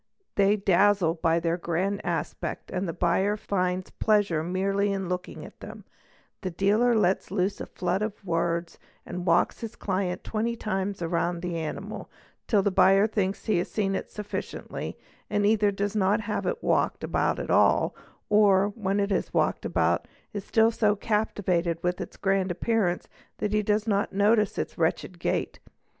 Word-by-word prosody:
They 200 +1 +4
dazzle 195 -2 +3
by 165 0 +1
their 165 0 0
grand 180 +4 -1
aspect - - -3
and 185 0 -2
the - - -1
buyer 190 +5 +1
finds 185 -2 -1
pleasure 205 -7 +2
merely 195 +4 0
in 195 -1 -2
_ - - -6
looking 180 0 -4
at - - -14
them; - - -10 0.6
the 185 - -2
dealer 210 +7 +2
lets 195 -3 +1
loose 190 0 -1
a - - -5
flood 180 +2 -2
of 210 -1 -4
words 170 0 -1 0.3
and 180 0 -5
walks 170 +1 +3
his 230 0 -6
client 185 -2 -2
twenty 230 +2 -1
times 195 -4 -3
round 170 +1 -1
the 175 -1 -2
animal, 160 -2 -5 0.4
till 205 -3 +3
the 200 - +2
buyer 195 +2 +5
thinks 200 -2 -1
he 215 -6 +2
has 175 - -2
seen 195 -2 0
it - - -3
sufficiently 210 -1 -6 0.3
and 205 0 +1
either 210 -1 +4
does 200 +1 -2
not 205 +1 +2
have 210 0 -3
it 480 - -2
walked - - +1
about - - 0
at - - -3
all - - +4 0.3
or, 205 -2 +4
when 200 -2 -1
it 200 0 0
is - - 0
walked - - +1
about, - - +1 0.3
is 205 -2 -4
still 225 +2 +3
so 215 -2 +2
captivated 195 -5 0
with 180 0 -1
its - - -7
grand 195 -1 +1
appearance 180 0 0 0.3
that 210 -1 -2
he 210 - +3
does 210 +1 +1
not 205 -2 0
notice 210 +1 +2
its - - -4
wretched - - -1
gait. - - -2
195 Hz, 175 wpm, -27 LUFS, 180-210 Hz, 0.6 s, buyer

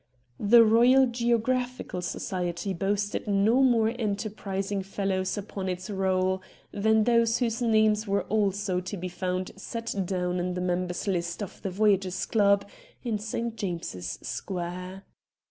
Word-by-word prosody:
The 230 +3 +7
Eoyal 240 +3 +5
Geographical 240 -3 0
Society 180 +1 -3
boasted 205 +4 -1
no 210 +5 +3
more 235 -4 +4
enterprising 200 -2 -2
fellows 190 0 -2
upon 195 -2 -4
its 185 +3 -4
roll 190 -1 +1 0.3
than 220 +1 +3
those 230 0 +3
whose 235 -1 -1
names 215 -2 +3
were 200 0 +1
also 200 -3 0
to 185 +2 -5
be 185 +1 -4
found 185 +1 -3
set 230 +3 -5
down 180 -1 -1
in 180 0 -2
the - - -2
members' 180 +1 -1
list 175 0 -1
of 195 - -9
the 195 - -2
Voyagers' 190 -1 +1
Club 200 -2 +3 0.4
in 225 -4 -1
St. 225 +2 -3
James's 170 - -4
Square. 180 +1 -5
200 Hz, 135 wpm, -27 LUFS, 185-220 Hz, 0.4 s, The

